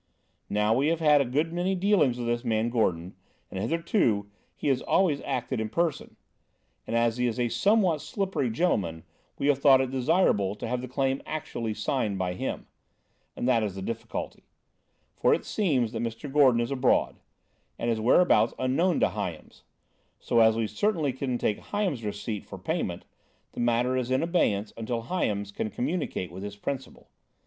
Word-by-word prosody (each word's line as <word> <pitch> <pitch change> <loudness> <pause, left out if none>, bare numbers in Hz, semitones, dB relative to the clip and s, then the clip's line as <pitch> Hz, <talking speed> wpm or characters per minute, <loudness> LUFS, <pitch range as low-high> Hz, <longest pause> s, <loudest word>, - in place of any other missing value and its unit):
Now, 105 +1 +2
we 135 +5 +2
have 165 0 +1
had 150 -3 +5
a - - +1
good 150 +7 -1
many 180 +2 0
dealings 180 - +2
with 120 - -4
this 120 +1 -1
man 115 -1 0
Gordon, 90 -7 0 0.4
and 95 - -4
hitherto 115 - 0 0.2
he - - -4
has 130 -2 +2
always 170 -7 +2
acted 120 -2 -2
in 110 - -3
person; 165 +2 -1 0.7
and - - -2
as 115 0 +2
he 125 0 +1
is 115 0 -3
a 120 -1 +1
somewhat 190 - +2
slippery 195 - -2
gentleman 100 - 0 0.3
we - - -2
have 145 -2 +3
thought 135 -2 +6
it 130 -1 -1
desirable 130 - +2
to 105 - -6
have 125 +1 -2
the 130 - -6
claim 135 +1 -1
actually 115 -8 -4
signed 105 -2 -1
by 90 -1 -1
him. 90 - -4 0.7
And - - -2
that 120 -3 +3
is 105 -3 -2
the 95 - -6
difficulty. 115 +2 -5 0.7
For - - +3
it - - -7
seems 135 - +1
that 115 -2 -4
Mr. 120 +4 -5
Gordon 130 -5 +5
is 120 +3 -2
abroad, 130 -2 +2 0.6
and 120 - -1
his 110 - -1
whereabouts 115 -2 +4
unknown 155 +8 +1
to - - +4
Hyams; - - -6 0.6
so, 120 - +1
as 110 -1 +6
we 115 - +1
certainly 160 - 0
couldn't 130 -1 -2
take 105 - -1
Hyams's 190 - -2
receipt 105 0 -4
for - - -8
payment, - - -3 0.5
the - - -9
matter 120 +2 +2
is 130 -1 -1
in 130 +4 +1
abeyance 110 - +1
until 115 +1 -3
Hyams 105 - -2
can 110 - -3
communicate 130 - -3
with 95 - -8
his 100 0 -6
principal. 130 +5 -6
125 Hz, 180 wpm, -27 LUFS, 110-150 Hz, 0.7 s, thought